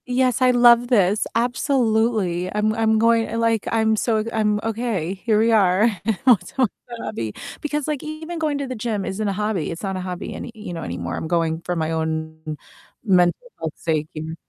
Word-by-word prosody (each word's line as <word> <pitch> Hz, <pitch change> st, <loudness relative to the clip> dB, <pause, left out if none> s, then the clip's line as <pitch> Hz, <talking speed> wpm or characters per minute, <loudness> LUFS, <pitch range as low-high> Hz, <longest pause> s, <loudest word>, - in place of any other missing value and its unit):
Yes, 255 Hz, -1 st, +1 dB
I 255 Hz, -, +5 dB
love 240 Hz, 0 st, +6 dB
this. 210 Hz, -4 st, +2 dB
Absolutely. 225 Hz, -, +1 dB
I'm 210 Hz, +1 st, +1 dB
I'm 220 Hz, -1 st, +2 dB
going 230 Hz, 0 st, +3 dB
eh, 230 Hz, -, -4 dB
like, 230 Hz, -2 st, +1 dB
I'm 220 Hz, -1 st, +2 dB
so 220 Hz, 0 st, +1 dB
I'm 210 Hz, -1 st, +1 dB
okay. 220 Hz, -6 st, -2 dB
Here 210 Hz, +3 st, 0 dB
we 225 Hz, +2 st, +3 dB
are 195 Hz, -2 st, +4 dB, 0.2 s
and 220 Hz, -3 st, +1 dB
we're 250 Hz, -3 st, +8 dB
talking 255 Hz, +5 st, -1 dB, 0.2 s
about 240 Hz, -1 st, -8 dB
hobby, 110 Hz, -2 st, -4 dB, 0.3 s
because, 295 Hz, -1 st, -2 dB
like, 300 Hz, -3 st, -2 dB
even 315 Hz, +2 st, -6 dB
going 305 Hz, -3 st, 0 dB
to 280 Hz, -1 st, -3 dB
the 255 Hz, -, -4 dB
gym 215 Hz, -3 st, -2 dB
isn't 210 Hz, +2 st, -2 dB
a -, -, +1 dB
hobby. 210 Hz, -4 st, -1 dB
It's 165 Hz, -, -7 dB
not 190 Hz, -1 st, -2 dB
a -, -, -4 dB
hobby 180 Hz, -1 st, -5 dB
any -, -, -7 dB
you 210 Hz, -5 st, -7 dB
know, 165 Hz, -, -5 dB
anymore. 85 Hz, 0 st, -4 dB
I'm -, -, -4 dB
going 165 Hz, -1 st, 0 dB
for 175 Hz, +1 st, -3 dB
my 160 Hz, -1 st, -1 dB
own 160 Hz, -1 st, -3 dB, 0.5 s
mental 185 Hz, -, +2 dB
health 160 Hz, -2 st, -3 dB
sake 155 Hz, -2 st, -1 dB
here. 160 Hz, +1 st, -5 dB
215 Hz, 205 wpm, -22 LUFS, 175-235 Hz, 0.5 s, we're